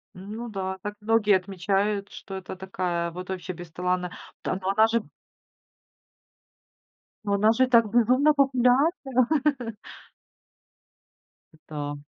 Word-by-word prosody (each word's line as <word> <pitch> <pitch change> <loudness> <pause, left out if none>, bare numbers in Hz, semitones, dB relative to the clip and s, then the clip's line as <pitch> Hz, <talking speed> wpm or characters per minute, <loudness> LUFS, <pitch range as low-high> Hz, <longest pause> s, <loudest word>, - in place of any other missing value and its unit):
Ну 210 +6 -7
да, 190 -2 -4
так 205 - -4
многие 210 -1 +3
отмечают, 195 +2 -1
что 195 - -9
это 190 0 -7
такая 180 -2 -2
вот 180 +2 -8
вообще 185 -1 -4
бесталанная. 180 +1 -3 0.3
Т - - -1
Но 190 - -2
она 215 +3 +5
же 230 +1 +1 2.2
Но 200 -1 -1
она 210 +2 +4
же 260 +2 +3
так 230 -3 +4
безумно 255 +7 +4
популярна. 265 0 +2 2.3
Эта 145 -2 -7
200 Hz, 110 wpm, -26 LUFS, 185-235 Hz, 2.3 s, она